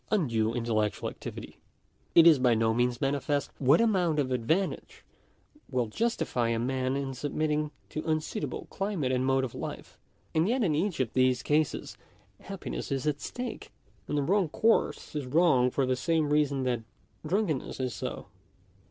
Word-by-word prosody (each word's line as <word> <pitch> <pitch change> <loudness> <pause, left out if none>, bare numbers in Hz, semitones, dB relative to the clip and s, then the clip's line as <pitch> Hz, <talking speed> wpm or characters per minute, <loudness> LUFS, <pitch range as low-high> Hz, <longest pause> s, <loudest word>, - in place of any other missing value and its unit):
83 - - +4
undue 115 -6 0
intellectual 110 -3 -1
activity; - - -9 0.6
it 165 - +8
is 160 -5 +7
by 125 -2 +4
no 110 0 +2
means 120 +1 0
manifest 140 +1 0
what 140 +3 +5
amount 185 -9 +2
of 135 -3 0
advantage 145 +11 -1 0.6
will 125 -3 0
justify 125 - -1
a 115 - +1
man 130 +2 -1
in 135 -1 -3
submitting 150 +2 -1 0.2
to 155 - -4
un 155 0 +2
suitable 205 +7 -5
climate 195 -10 -1
and 130 0 +1
mode 135 0 +2
of 130 - -4
life; - - -7 0.3
and 165 +5 +2
yet 250 0 +1
in 170 -7 +2
each 170 +2 -1
of 125 -4 -1
these 130 0 +2
cases 150 0 0 0.4
happiness - - -6
is 135 0 -1
at 145 -1 -1
stake, 250 0 -6 0.4
and 150 - -1
the 145 - +1
wrong 190 +2 +2
course 225 -2 +1
is 145 -3 -3
wrong 135 -4 +4
for 135 +1 0
the 130 0 +1
same 150 +4 0
reason 140 -3 +2
that 125 -3 0 0.4
drunkenness 160 -6 -1
is 130 -2 -2
so. - - -5
140 Hz, 170 wpm, -29 LUFS, 125-160 Hz, 0.6 s, it